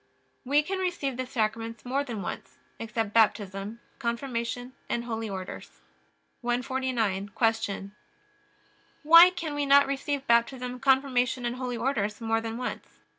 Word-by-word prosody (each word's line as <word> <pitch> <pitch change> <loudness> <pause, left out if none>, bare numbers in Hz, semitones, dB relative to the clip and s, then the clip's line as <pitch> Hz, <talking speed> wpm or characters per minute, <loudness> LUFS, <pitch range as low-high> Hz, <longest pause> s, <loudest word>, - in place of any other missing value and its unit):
We 285 +3 +3
can 380 +4 -3
receive 345 -8 -1
the 255 0 -4
Sacraments 225 -2 -2
more 270 +3 0
than 230 -8 -5
once, - - -7 0.2
except 225 -2 -3
Baptism, 205 -1 +1 0.2
Confirmation, 245 0 -3 0.2
and 235 - -1
Holy 225 -2 -4
Orders. 190 -2 -7 0.6
149. 240 -5 -1
Q. 205 -3 -1 1.1
Why 335 +3 +9
can 340 -4 -5
we 290 -1 -1
not 280 0 +7
receive 275 0 -2
Baptism, 250 +2 +1
Confirmation, 260 -2 +2
and 240 +1 -2
Holy 250 -2 -3
Orders 215 -4 -1
more 225 -1 0
than 225 0 -4
once? 250 - -4
245 Hz, 130 wpm, -28 LUFS, 225-270 Hz, 1.1 s, Why